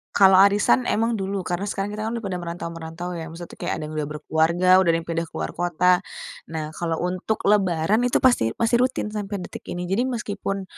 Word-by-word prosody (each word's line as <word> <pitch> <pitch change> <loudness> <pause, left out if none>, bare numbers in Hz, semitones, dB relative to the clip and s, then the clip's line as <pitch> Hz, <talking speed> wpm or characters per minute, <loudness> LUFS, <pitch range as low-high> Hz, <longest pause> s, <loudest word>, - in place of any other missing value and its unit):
Kalau 190 -1 +7
arisan 195 -11 +4
emang 230 +2 +1
dulu 195 -1 -2
karena 180 +3 -2
sekarang 195 +1 -2
kita 215 - -5
kan - - -2
udah 225 - -7
pada 185 -2 -2
merantau-merantau 170 0 -6
ya, 160 0 -6
maksudnya 170 +1 -9
tuh - - -14
kayak - - -2
ada - - -5
yang 155 - -7
udah 150 -1 -1
berkeluarga, 160 +4 +1
udah 170 - +2
ada 165 - +1
yang 165 - -6
pindah 165 0 -2
keluar - - -4
kota. 175 +1 +2 0.5
Nah, 155 -1 -4
kalau 165 -1 -2
untuk 185 +4 -2
Lebaran 200 +1 +3
itu - - +2
pasti 245 - +4
masih 230 +1 +2
rutin 255 -4 -1
sampai 205 -1 -4
detik - - -8
ini. 175 0 -4
Jadi 215 +8 0
meskipun 200 -4 -3
180 Hz, 210 wpm, -23 LUFS, 165-205 Hz, 0.5 s, Kalau